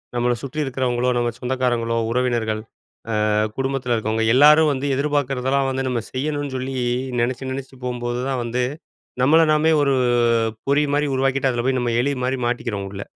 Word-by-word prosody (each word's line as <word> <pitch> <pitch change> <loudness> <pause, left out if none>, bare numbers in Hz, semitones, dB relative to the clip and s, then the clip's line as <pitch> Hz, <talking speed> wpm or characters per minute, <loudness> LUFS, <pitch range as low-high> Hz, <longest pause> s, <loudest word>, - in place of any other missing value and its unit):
நம்மள 120 0 +1
சுற்றி 140 +2 -6
இருக்கிறவங்களோ, 125 -2 -1
நம்ம 120 0 +1
சொந்தக்காரங்களோ, 125 -2 -1
உறவினர்கள். 120 -3 0 0.5
அ - - -1 0.4
குடும்பத்தில 135 -2 -1
இருக்கவங்க 110 0 -1
எல்லாரும் 150 +3 +6
வந்து 135 +1 -3
எதிர்பார்க்கிறதெல்லாம் 135 -1 0
வந்து 135 0 -2
நம்ம 120 -2 -1
செய்யணும்னு 145 +1 -3
சொல்லி, 130 +1 -4 0.5
நெனச்சி, 130 +2 -2
நெனச்சிட்டு 130 -1 -7
போம்போது 120 -1 -3
தான் 130 -2 -1
வந்து, 120 +2 -1 0.6
நம்மள 155 +5 +5
நாமே 155 +1 +3
ஒரு 140 -1 +2 0.7
பொறி 145 +2 +3
மாரி 145 0 +1
உருவாக்கிட்டு, 135 0 +1
அதில 120 -1 -2
போய் 130 -1 +1
நம்ம 120 -1 -1
எலி 140 +2 0
மாரி 130 +1 -1
மாட்டிக்கிறோம் 110 -5 -3
உள்ள. 100 0 -6
130 Hz, 155 wpm, -21 LUFS, 120-135 Hz, 0.7 s, எல்லாரும்